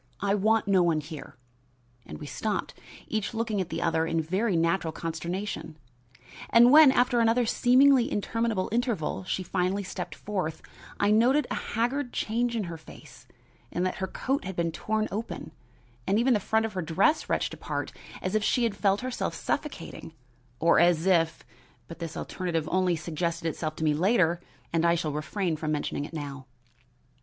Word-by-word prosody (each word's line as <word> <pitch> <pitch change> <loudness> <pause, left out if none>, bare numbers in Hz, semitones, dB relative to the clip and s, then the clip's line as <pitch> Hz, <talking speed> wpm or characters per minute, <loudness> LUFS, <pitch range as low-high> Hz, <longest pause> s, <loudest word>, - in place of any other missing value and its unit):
I 200 0 +1
want 215 +2 +2
no 195 -2 +4
one 170 -3 +2
here!" 155 0 -9 0.7
and 75 - -7
we - - -8
stopped, - - -3 0.3
each 220 +1 -2
looking 220 -3 -1
at 180 - -4
the - - -3
other 165 -1 +1
in 165 - 0
very 185 +6 0
natural 165 0 +1
consternation. 165 +1 -4 0.7
And 240 +2 +7
when, 300 -2 +9
after 245 -1 +2
another 230 +1 +3
seemingly 255 +2 +4
interminable 220 -1 -1
interval, 230 - -1
she 185 - -2
finally 185 +2 -1
stepped 180 - -6
forth, 185 -6 -4 0.4
I 205 +1 +3
noted 250 +7 +4
a - - +1
haggard 245 +3 -2
change 235 +2 -1
in 220 - 0
her 170 -3 -6
face, - - -15 0.4
and 180 - -1
that 185 - -2
her 190 - -2
coat 270 +8 -2
had 190 0 -5
been 170 -1 0
torn 215 +6 -1
open 220 +3 -5 0.6
and 200 - +3
even 245 +3 +3
the 215 - +2
front 220 +3 +1
of 220 - -5
her 185 - -2
dress 190 - +1
wrenched - - 0
apart - - -4 0.3
as 185 - -2
if 215 -1 +1
she 240 +2 +2
felt 200 0 +1
herself 255 0 -3
suffocating, 190 - -4 0.5
or 165 - +4
as 170 -1 +4
if 165 -4 +2 0.4
but 165 - -10
this 165 -2 -5
alternative 165 -4 -3
only 185 -1 +2
suggested 165 +1 -3
itself 155 -1 -3
to 160 - -5
me 155 -1 +3
later 175 0 +2 0.3
and 165 0 +2
I 170 0 +4
shall 160 -3 -2
refrain 160 +3 -2
from 155 0 -2
mentioning 145 -1 -2
it - - -11
now. 140 -4 -6
190 Hz, 175 wpm, -27 LUFS, 165-225 Hz, 0.7 s, when